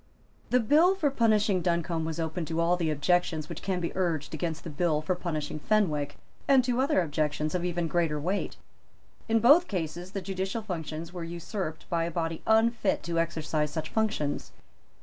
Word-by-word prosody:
The 250 - +4
bill 310 - +4
for 300 -7 +1
punishing 215 -6 +3
Duncombe 170 -1 0
was 160 0 -4
open 165 +2 -2
to 165 +1 -3
all 170 +1 +3
the 170 -3 -1
objections 155 +1 +1
which 170 - -7
can 185 -2 -1
be 170 - -3
urged 165 -6 -1
against 160 0 -3
the 165 - -6
bill 155 0 +1
for 170 - +1
punishing 155 -4 -3
Fenwick, 150 -8 +1 0.3
and 270 -2 +6
to 245 +1 +1
other 275 -7 +3
objections 150 -1 -1
of 180 -1 -1
even 175 -1 -1
greater 160 -2 0
weight. 185 +7 -2 0.7
In 225 0 +4
both 290 +10 +6
cases 175 0 -4
the 195 - -3
judicial 190 +4 -3
functions 165 -3 -5
were 175 -2 -5
usurped 170 -1 -5
by 165 -1 +1
a - - -2
body 165 -1 -2
unfit 225 -2 +3
to 170 0 -1
exercise 155 -2 -1
such 155 +1 -4
functions. 215 -10 -1
170 Hz, 180 wpm, -28 LUFS, 160-200 Hz, 0.7 s, and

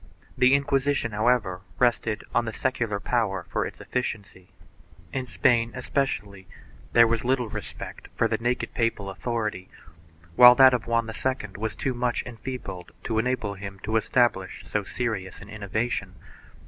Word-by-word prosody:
The 130 +1 +5
Inquisition, 140 -3 +1
however, 105 -4 +1 0.2
rested 115 -3 +1
on 120 - +2
the 115 - -4
secular 115 -6 -1
power 100 -6 0
for - - 0
its - - -11
efficiency. 100 -7 -4 0.6
In 130 -1 -2
Spain, 120 -3 +2
especially, 100 -8 -2 0.5
there 115 0 +8
was 115 -1 0
little 125 -2 +1
respect - - -7
for - - +2
the - - -1
naked 120 +2 -1
papal 115 -4 -1
authority, 105 -3 -3 0.7
while 125 +3 +10
that 130 0 +8
of 120 -3 -1
Juan 115 -1 +1
II 110 -1 -2
was 110 +2 -3
too 135 - -1
much 120 0 -1
enfeebled 125 -6 -7
to 110 -2 0
enable 115 -4 -1
him 100 0 -8
to 110 - -2
establish 110 -5 +1
so 105 - -1
serious 100 -3 -3
an 100 - -12
innovation. 110 +3 -3
115 Hz, 150 wpm, -26 LUFS, 105-125 Hz, 0.7 s, while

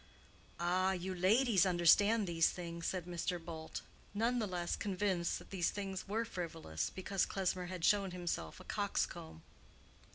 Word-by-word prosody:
"Ah, 185 +2 +2
you 185 +1 -3
ladies 200 +3 +4
understand 200 +4 +5
these 165 -2 +3
things," 170 -1 -5
said 185 -3 -2
Mr. 175 0 -2
Bult, 165 -1 -7 0.3
none 235 +4 +2
the 215 - 0
less 175 -2 -2
convinced 190 -3 0
that - - -13
these 180 -4 +1
things 195 -2 -4
were 220 +3 0
frivolous 165 - -3
because 190 0 -1
Klesmer 185 -2 -1
had 180 -2 -2
shown 200 -2 +4
himself 175 - -4
a - - -10
coxcomb. 80 0 -2
180 Hz, 150 wpm, -36 LUFS, 170-195 Hz, 0.3 s, understand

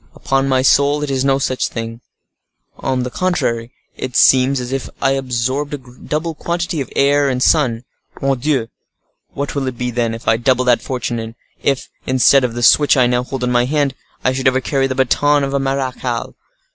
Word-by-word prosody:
Upon 135 0 0
my 130 -1 +2
soul, 140 +2 +3
it 145 - -3
is 130 -1 0
no 135 0 +3
such 130 -1 -1
thing, 115 0 -6 0.7
on 130 -2 -2
the 125 - -4
contrary, 120 -11 -1 0.2
it 130 -1 -6
seems 130 +1 +4
as 125 0 -5
if 135 -1 -3
I 135 - +2
absorbed 135 +2 -1
a - - -6
double 150 +6 -5
quantity 170 0 -3
of 135 - -6
air 140 0 +3
and 130 -1 0
sun. 125 -7 +2 0.4
Mordioux! 135 -2 0 0.6
what 140 0 -4
will 140 -2 -2
it 130 -2 -4
be 125 0 -2
then, 115 -1 -1
if 115 - -11
I 110 - +4
double 125 +1 +1
that 125 -1 +3
fortune; 125 -2 -3
and 115 0 -7 0.3
if, 135 -2 0 0.2
instead 130 +1 +4
of 120 -2 -2
the 120 - -3
switch 145 +5 +5
I 125 - +5
now 125 0 +1
hold 130 0 -5
in 125 - 0
my 120 0 +3
hand, 145 0 0 0.3
I 130 - +3
should 130 0 0
ever 130 0 +3
carry 135 0 0
the 130 - -3
baton 145 +3 +2
of 135 0 -2
a 140 - +1
marechal? 130 -3 -2
130 Hz, 200 wpm, -17 LUFS, 125-140 Hz, 0.7 s, switch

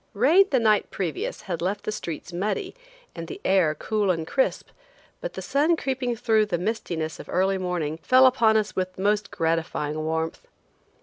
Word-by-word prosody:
Rain 310 - +5
the 265 - +2
night 215 -2 +2
previous 170 -7 -3
had 175 -4 -4
left 195 +4 -2
the - - -2
streets 170 -3 -6
muddy 215 - -2 0.4
and 165 -1 -7
the - - -7
air 180 -5 +3
cool 210 +1 -1
and 165 -3 0
crisp, 265 +10 0 0.5
but - - -5
the - - -6
sun 295 +5 +2
creeping 260 -5 -2
through 220 -1 +2
the 180 -4 -1
mistiness 170 -5 -3
of - - -10
early 190 +1 +1
morning, 170 -4 -2
fell 255 +6 +6
upon 230 -4 +4
us 215 -1 -1
with 185 0 -3
most 205 +1 +1
gratifying 160 -2 -1
warmth. 160 +1 -3
195 Hz, 175 wpm, -25 LUFS, 165-225 Hz, 0.5 s, fell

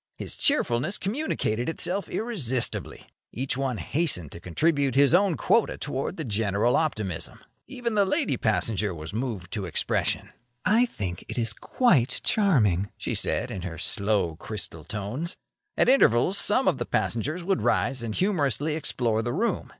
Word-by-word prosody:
His - - -3
cheerfulness 155 - +1
communicated 195 - -1
itself 185 +4 -1
irresistibly. 145 - -1 0.3
Each 130 +2 -2
one 130 -3 -1
hastened 135 - -1
to 85 - -9
contribute 140 - +1
his 140 +2 +5
own 185 -2 +4
quota 230 - +2
toward 140 +5 -3
the 160 - -3
general 110 +1 +1
optimism. 110 - -2 0.3
Even 245 -3 -3
the 205 -1 +4
lady 285 - +1
passenger 110 -3 0
was 80 +3 -8
moved 110 -6 -4
to 100 -4 -3
expression. 85 - -1 0.3
"I 235 +4 +4
think 95 - -5
it - - -3
is 115 -2 0
quite 145 - +2
charming," 110 - +3
she - - -2
said, - - +1
in 95 - -5
her 85 -2 -6
slow, 100 -5 0
crystal 100 -7 -6
tones. 110 - -4 0.4
At - - +4
intervals 190 - +4
some - - +2
one - - +4
of - - -10
the - - -3
passengers 150 +10 -1
would 190 +1 0
rise 130 -1 +1
and 115 -2 -4
humorously 150 - +1
explore 120 -7 0
the 120 +1 -2
room. 230 - -1
130 Hz, 160 wpm, -26 LUFS, -, 0.4 s, his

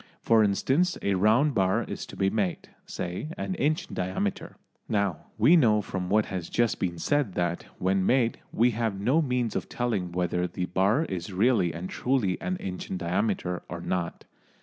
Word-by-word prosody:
For 115 -1 +5
instance, 135 - +1
a 100 - +2
round 110 +10 +3
bar 95 -3 +2
is - - -6
to - - -10
be 95 0 +1
made, 100 -5 -2 0.2
say, 90 - -4
an 190 - -3
inch 155 +1 0
in - - -11
diameter. 95 +2 -2 0.3
Now 100 -6 -1
we 170 - +6
know 110 -9 +4
from 90 -2 -4
what 105 +2 +3
has 90 -4 -5
just 120 -1 +1
been 85 -2 -2
said 135 - 0
that, 85 -1 -1
when 95 +1 +1
made, 120 +2 +2
we 120 +2 +3
have 110 -3 -2
no 130 +11 +3
means 125 -6 -1
of - - -3
telling 105 -8 -1
whether 90 0 0
the 90 +1 -3
bar 100 - +2
is 90 - -5
really 95 -2 +2
and 85 +3 -5
truly 125 -8 0
an 185 0 -2
inch 90 - -6
in 95 - -2
diameter 90 0 -1
or 85 - -5
not. 85 0 -3
100 Hz, 185 wpm, -27 LUFS, 90-120 Hz, 0.3 s, we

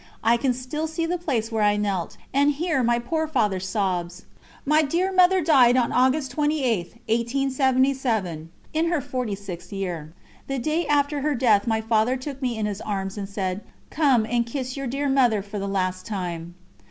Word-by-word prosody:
I 230 +2 +5
can 255 +2 +1
still 275 +6 -4
see 320 +1 -2
the 350 +1 -2
place 240 -9 -1
where 220 -1 0
I 205 0 +3
knelt, 200 -4 -2 0.2
and 285 +2 +4
hear 310 -1 0
my 240 0 +2
poor 315 +7 -1
Father's 210 -10 0
sobs. 185 -3 -2 0.4
My 305 +2 +4
dear 340 +6 0
Mother 370 0 +5
died 260 -6 +5
on 240 -2 +2
August 260 +2 +2
28, 270 - 0
1877, 255 - 0 0.2
in 320 +2 +1
her 335 -2 +1
forty 250 -5 -3
sixth 180 -3 -9
year. 175 -6 -4 0.4
The 275 - -2
day 310 +5 -1
after 290 0 +1
her 295 0 0
death 225 -4 +3
my 220 -1 +1
Father 225 +3 +1
took 270 +1 -7
me 245 -3 -1
in 215 - -1
his 205 -1 -3
arms 195 -2 -3
and 200 -2 -5
said: 190 -1 -3 0.3
"Come 270 -7 +3
and 235 +1 +1
kiss 255 +1 -4
your 275 -1 -4
dear 275 +4 -1
Mother 245 -7 +3
for 205 +1 -6
the 200 - -3
last 185 -1 -2
time." 175 -5 -5
240 Hz, 185 wpm, -24 LUFS, 200-280 Hz, 0.4 s, I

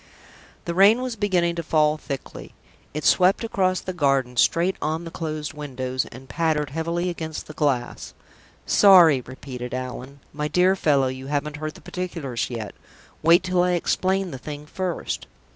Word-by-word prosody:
The 170 - -2
rain 205 +7 +5
was 255 -3 -3
beginning 185 -5 +1
to - - -1
fall 155 -1 +2
thickly. 140 -3 -8 0.4
It 150 +1 -5
swept 185 +4 +4
across 185 -5 0
the 185 - -5
garden, 135 -6 +1
straight 170 +9 +2
on 155 +3 -2
the 165 - -8
closed 155 -3 -4
windows, 130 -3 -3
and 130 +2 -12
pattered 155 -3 0
heavily 170 +3 -2
against 160 -3 -5
the 155 - -10
glass. 135 -5 -2 0.5
"Sorry!" 175 -9 +7
repeated 125 -1 -7
Allan. 130 +2 -6
"My 150 0 -2
dear 180 +4 +3
fellow, 145 -7 +2
you 130 +1 -5
haven't 150 +1 -2
heard 155 0 -5
the - - -14
particulars 165 -9 -4
yet. 115 -4 -5 0.5
Wait 170 +3 +5
till 185 -1 +1
I 180 0 +2
explain 185 +2 0
the 130 - -7
thing 150 +2 -7
first." 180 +2 -4
155 Hz, 160 wpm, -24 LUFS, 135-180 Hz, 0.5 s, Sorry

